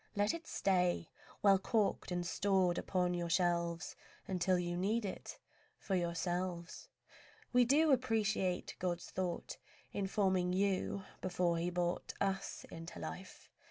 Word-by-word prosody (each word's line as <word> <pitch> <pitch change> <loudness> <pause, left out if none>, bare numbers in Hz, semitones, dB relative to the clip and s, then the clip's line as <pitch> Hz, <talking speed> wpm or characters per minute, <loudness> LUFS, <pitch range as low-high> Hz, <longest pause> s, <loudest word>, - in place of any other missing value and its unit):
Let 205 +1 +2
it 335 -1 -7
stay, 180 -3 +1 0.3
Well 195 -2 +6
corked 210 +1 +1
and 175 0 -1
stored 185 -1 +2
upon 180 -2 0
your 175 -1 -2
shelves, 170 -1 +1 0.3
Until 185 0 +2
you 175 0 -1
need 210 +5 +1
it 195 - -6 0.4
for 195 - -4
yourselves. 175 - -2 0.6
We 245 0 +6
do 300 +5 +5
appreciate 215 -7 +1
God's 175 -1 -2
thought 180 -2 -3 0.4
In 200 -1 -1
forming 190 -3 +2
you, 195 0 0 0.2
before 175 -2 +1
He 170 +1 0
brought 175 0 -1
Us 195 -1 -2
into 165 +1 -8
life. 185 0 -7
185 Hz, 130 wpm, -36 LUFS, 175-200 Hz, 0.6 s, Well